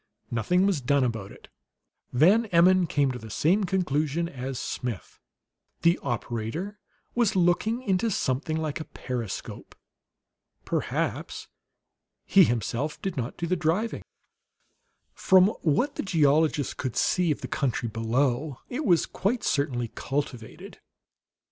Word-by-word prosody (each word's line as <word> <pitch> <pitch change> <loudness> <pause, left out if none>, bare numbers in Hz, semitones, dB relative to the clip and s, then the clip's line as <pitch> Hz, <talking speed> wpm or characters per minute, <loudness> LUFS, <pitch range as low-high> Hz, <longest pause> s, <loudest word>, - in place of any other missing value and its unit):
Nothing 150 - +2
was 190 -8 +1
done 140 +2 +2
about 110 -5 -3
it. - - -15 0.6
Van 190 - +4
Emmon 180 0 +4
came 145 -3 +1
to 125 - -6
the 110 - -10
same 185 - +2
conclusion 170 -3 0
as 135 -4 -5
Smith; 120 -5 -5 0.6
the 170 +1 +4
operator 120 - -4 0.3
was 235 -5 +2
looking 190 +7 +2
into 195 +1 +1
something 155 -3 -1
like 155 -1 -3
a - - -4
periscope. 120 -6 -6 0.9
Perhaps - - -2 0.8
he 195 -3 +6
himself 120 +5 -2
did 190 -2 -2
not 125 -1 -4
do 170 - -2
the 180 +2 +1
driving. 175 +7 -1 1.1
From 190 +1 +5
what 210 - +1
the - - -3
geologist 155 -4 +2
could 130 -4 -3
see 180 -2 +2
of 150 - -1
the - - -5
country 125 -4 -1
below, 120 +5 0
it 270 +5 -3
was 175 -6 +4
quite 225 +5 -1
certainly 125 -4 0
cultivated. 135 -5 -5
155 Hz, 130 wpm, -26 LUFS, 125-185 Hz, 1.1 s, he